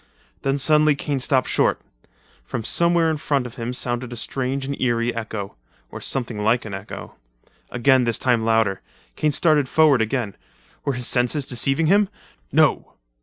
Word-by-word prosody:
Then 135 Hz, +1 st, 0 dB
suddenly 150 Hz, +1 st, +4 dB
Kane 140 Hz, 0 st, -3 dB
stopped 130 Hz, 0 st, +1 dB
short. -, -, +1 dB, 0.6 s
From 115 Hz, -, -5 dB
somewhere 170 Hz, +4 st, +2 dB
in 155 Hz, -, -2 dB
front 140 Hz, -3 st, -1 dB
of 120 Hz, -, -8 dB
him 120 Hz, 0 st, -4 dB
sounded 125 Hz, 0 st, -3 dB
a -, -, -5 dB
strange 135 Hz, +3 st, -3 dB
and 140 Hz, +1 st, -3 dB
eery 120 Hz, -1 st, 0 dB
echo—or 100 Hz, -, -8 dB
something 115 Hz, -5 st, -2 dB
like 115 Hz, +3 st, +2 dB
an 105 Hz, -, -7 dB
echo. 95 Hz, +2 st, -8 dB, 0.5 s
Again, 130 Hz, +1 st, +3 dB
this 115 Hz, -2 st, +1 dB
time 120 Hz, -3 st, +1 dB
louder. 110 Hz, -4 st, +1 dB, 0.3 s
Kane 150 Hz, -, +1 dB
started 150 Hz, -3 st, +2 dB
forward 150 Hz, -6 st, +4 dB
again. 110 Hz, -2 st, -2 dB, 0.5 s
Were 140 Hz, -, 0 dB
his 125 Hz, -1 st, -2 dB
senses 125 Hz, +4 st, +1 dB
deceiving 135 Hz, +5 st, +1 dB
him? 200 Hz, +4 st, +3 dB, 0.4 s
No! -, -, +2 dB
125 Hz, 160 wpm, -22 LUFS, 115-140 Hz, 0.6 s, suddenly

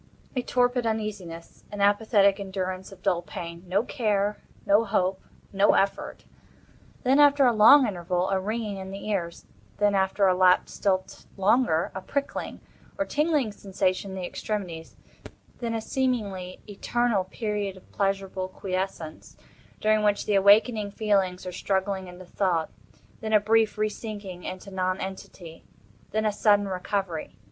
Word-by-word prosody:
A 250 Hz, -, +1 dB
torpid 245 Hz, -1 st, +1 dB
uneasiness. 200 Hz, -7 st, -5 dB
An 205 Hz, -, -6 dB
apathetic 205 Hz, -1 st, +3 dB
endurance 190 Hz, -1 st, -4 dB
of 185 Hz, -1 st, -15 dB
dull 175 Hz, -1 st, +1 dB
pain. 170 Hz, 0 st, -8 dB
No 195 Hz, +4 st, +1 dB
care—no 210 Hz, -3 st, 0 dB
hope—no 195 Hz, 0 st, 0 dB
effort. 195 Hz, 0 st, -1 dB, 0.8 s
Then, 265 Hz, +3 st, +4 dB
after 285 Hz, -1 st, +6 dB
a 245 Hz, -, +4 dB
long 240 Hz, +6 st, +8 dB
interval, 180 Hz, -2 st, -1 dB
a 190 Hz, -, +2 dB
ringing 210 Hz, +1 st, -3 dB
in 190 Hz, 0 st, -7 dB
the 195 Hz, +2 st, -7 dB
ears; 170 Hz, -5 st, -3 dB, 0.3 s
then, 205 Hz, -1 st, +3 dB
after 195 Hz, +1 st, +2 dB
a 185 Hz, -, +5 dB
lapse 180 Hz, 0 st, +3 dB
still 190 Hz, -2 st, +1 dB, 0.3 s
longer, 195 Hz, -4 st, +2 dB
a 190 Hz, -, -5 dB
prickling 280 Hz, +7 st, -4 dB, 0.4 s
or 290 Hz, -, 0 dB
tingling 295 Hz, -7 st, +1 dB
sensation 195 Hz, -1 st, -2 dB
in 190 Hz, -, -6 dB
the 185 Hz, -, -4 dB
extremities; 175 Hz, -6 st, -5 dB, 0.6 s
then 230 Hz, -2 st, -2 dB
a 225 Hz, -, -2 dB
seemingly 210 Hz, -8 st, -2 dB
eternal 215 Hz, 0 st, 0 dB
period 205 Hz, -1 st, -3 dB
of 185 Hz, -, -18 dB
pleasurable 195 Hz, -2 st, -1 dB
quiescence, 185 Hz, -4 st, -5 dB, 0.4 s
during 215 Hz, 0 st, +3 dB
which 205 Hz, -1 st, +1 dB
the 210 Hz, -, 0 dB
awakening 205 Hz, +2 st, +4 dB
feelings 195 Hz, -4 st, 0 dB
are 180 Hz, -, -4 dB
struggling 190 Hz, +1 st, -2 dB
into 180 Hz, +1 st, -11 dB
thought; 175 Hz, -3 st, -1 dB, 0.5 s
then 220 Hz, -1 st, -3 dB
a 215 Hz, -, +7 dB
brief 220 Hz, +1 st, +2 dB
re 215 Hz, 0 st, +2 dB
sinking 205 Hz, -4 st, -7 dB
into 185 Hz, +2 st, -7 dB
non 185 Hz, 0 st, -1 dB
entity; 185 Hz, -3 st, -8 dB, 0.5 s
then 220 Hz, +1 st, -1 dB
a 215 Hz, -, +3 dB
sudden 205 Hz, -1 st, +3 dB
recovery. 185 Hz, -3 st, -3 dB
200 Hz, 145 wpm, -26 LUFS, 185-215 Hz, 0.8 s, long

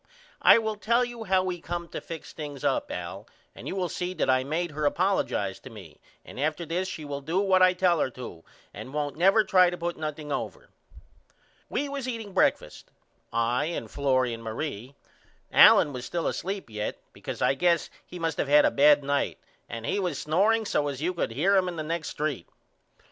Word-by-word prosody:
I -, -, +8 dB
will 220 Hz, -2 st, -2 dB
tell 235 Hz, +4 st, +2 dB
you 240 Hz, -2 st, -8 dB
how 190 Hz, -1 st, +2 dB
we 180 Hz, -2 st, -3 dB
come 170 Hz, 0 st, -4 dB
to -, -, -6 dB
fix 165 Hz, -2 st, -9 dB
things 145 Hz, -3 st, -7 dB
up -, -, 0 dB
Al -, -, -6 dB, 0.3 s
and -, -, -10 dB
you -, -, -3 dB
will 185 Hz, -2 st, -1 dB
see 180 Hz, +2 st, -4 dB
that 130 Hz, -, +2 dB
I 130 Hz, 0 st, +2 dB
made 160 Hz, +4 st, -2 dB
her 150 Hz, 0 st, +1 dB
apollojize 185 Hz, -, 0 dB
to -, -, -10 dB
me 95 Hz, -9 st, -13 dB, 0.2 s
and -, -, -10 dB
after 155 Hz, +3 st, -1 dB
this 175 Hz, +4 st, -2 dB
she 160 Hz, -5 st, -6 dB
will 140 Hz, -1 st, -5 dB
do 165 Hz, +7 st, -1 dB
what 190 Hz, -2 st, +3 dB
I 185 Hz, 0 st, +6 dB
tell 180 Hz, -2 st, +2 dB
her 135 Hz, -, +1 dB
to 120 Hz, -10 st, -9 dB, 0.3 s
and 135 Hz, -, -9 dB
won't 145 Hz, -2 st, -2 dB
never 195 Hz, +6 st, +4 dB
try 185 Hz, -4 st, +5 dB
to 175 Hz, -, -5 dB
put 175 Hz, 0 st, -3 dB
nothing 150 Hz, -1 st, -5 dB
over. -, -, -4 dB, 1.0 s
We 290 Hz, -, -1 dB
was 280 Hz, -2 st, -5 dB
eating 225 Hz, -5 st, -5 dB
breakfast 190 Hz, -, 0 dB, 0.4 s
I 115 Hz, +4 st, +1 dB
and 170 Hz, +2 st, -5 dB
Florrie 130 Hz, -3 st, +1 dB
and 115 Hz, -, -7 dB
Marie. 120 Hz, +2 st, -5 dB, 0.6 s
Allen 145 Hz, -, +7 dB
was 125 Hz, -1 st, -6 dB
still 170 Hz, +7 st, -3 dB
asleep 195 Hz, +1 st, -3 dB
yet 105 Hz, 0 st, -3 dB, 0.2 s
because -, -, -7 dB
I -, -, +4 dB
guess 170 Hz, +2 st, +1 dB
he 180 Hz, -, -10 dB
must 165 Hz, -2 st, -2 dB
of -, -, 0 dB
had 150 Hz, +1 st, +6 dB
a -, -, +3 dB
bad 145 Hz, 0 st, +5 dB
night 140 Hz, 0 st, -1 dB, 0.3 s
and 115 Hz, 0 st, -6 dB
he 205 Hz, -, 0 dB
was 180 Hz, -7 st, -2 dB
snoreing 210 Hz, +8 st, +2 dB
so 145 Hz, -7 st, 0 dB
as 140 Hz, 0 st, -4 dB
you 180 Hz, +2 st, 0 dB
could 170 Hz, -, -2 dB
hear 160 Hz, +13 st, +2 dB
him 185 Hz, -1 st, +3 dB
in 180 Hz, -, -4 dB
the 155 Hz, -, -4 dB
next 160 Hz, 0 st, -4 dB
st. 145 Hz, -, -2 dB
165 Hz, 210 wpm, -27 LUFS, 140-185 Hz, 1.0 s, I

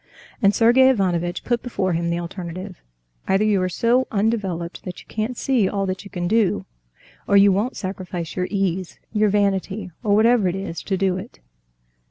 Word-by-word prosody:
And 200 Hz, 0 st, +4 dB
Sergey 245 Hz, +4 st, +6 dB
Ivanovitch 175 Hz, -7 st, 0 dB
put 240 Hz, -1 st, 0 dB
before 190 Hz, -7 st, -1 dB
him 170 Hz, +1 st, -1 dB
the 170 Hz, -, 0 dB
alternative: 180 Hz, +2 st, -7 dB, 0.5 s
either 195 Hz, +2 st, +3 dB
you 205 Hz, -3 st, +2 dB
are 185 Hz, -, 0 dB
so 235 Hz, +7 st, +2 dB
undeveloped 200 Hz, -5 st, -1 dB
that 180 Hz, -1 st, -7 dB
you -, -, -14 dB
can't 225 Hz, +3 st, -3 dB
see 245 Hz, -8 st, +1 dB
all 200 Hz, -1 st, -1 dB
that 185 Hz, 0 st, -3 dB
you 200 Hz, -, -11 dB
can 175 Hz, -2 st, -3 dB
do, 195 Hz, -, +1 dB, 0.6 s
or 200 Hz, -, +5 dB
you 200 Hz, 0 st, +7 dB
won't 210 Hz, +7 st, -1 dB
sacrifice 185 Hz, -3 st, -5 dB
your 180 Hz, 0 st, -1 dB
ease, 190 Hz, -3 st, -2 dB, 0.2 s
your 215 Hz, -1 st, +3 dB
vanity, 200 Hz, -1 st, 0 dB
or 205 Hz, -3 st, +2 dB
whatever 225 Hz, -1 st, +4 dB
it 180 Hz, -, -1 dB
is, 195 Hz, -4 st, -5 dB
to 190 Hz, -, -2 dB
do 190 Hz, -1 st, +1 dB
it. 185 Hz, -, -9 dB
195 Hz, 185 wpm, -22 LUFS, 180-215 Hz, 0.6 s, you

